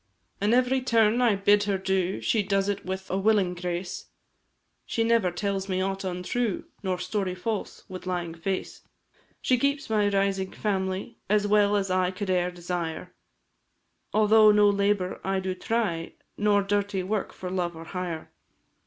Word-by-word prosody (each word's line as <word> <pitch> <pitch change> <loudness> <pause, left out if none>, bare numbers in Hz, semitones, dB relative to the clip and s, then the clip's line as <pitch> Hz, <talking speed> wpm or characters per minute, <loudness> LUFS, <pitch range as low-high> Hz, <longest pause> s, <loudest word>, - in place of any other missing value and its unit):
An' 205 +2 +2
every 255 +1 +2
turn 230 -1 +3
I 235 -4 +4
bid 205 +1 +3
her 200 -1 +1
do 190 -1 -1
She 220 - +2
does 195 0 0
it 200 -1 -2
with 190 +1 -5
a 190 - 0
willing 200 -3 +3
grace; 175 +1 -4 0.8
She 230 - -1
never 225 -5 +3
tells 195 +1 -2
me 185 0 0
aught 195 +1 -2
untrue, 190 +4 -2 0.2
Nor 190 -3 -1
story 190 -1 -2
false, 210 +3 -4
with 185 0 -8
lying 175 -2 -2
face; 185 +3 -4 0.6
She 255 -2 +3
keeps 280 -1 0
my 210 -2 +3
rising 195 -1 0
family 190 +1 -2
As 210 0 +3
well 205 0 +4
as 195 -2 0
I 185 -1 +2
could 190 +1 -3
e'er 180 -1 +2
desire, 175 -1 -4 1.0
Although 215 0 +6
no 210 0 +5
labour 200 -2 0
I 195 0 0
do 190 0 -2
try, 185 -5 -2 0.2
Nor 205 -1 +3
dirty 200 -1 0
work 200 +1 -2
for 180 -1 -7
love 175 -2 -1
or 165 0 -9
hire. 175 -3 -5
195 Hz, 160 wpm, -27 LUFS, 185-210 Hz, 1.0 s, Although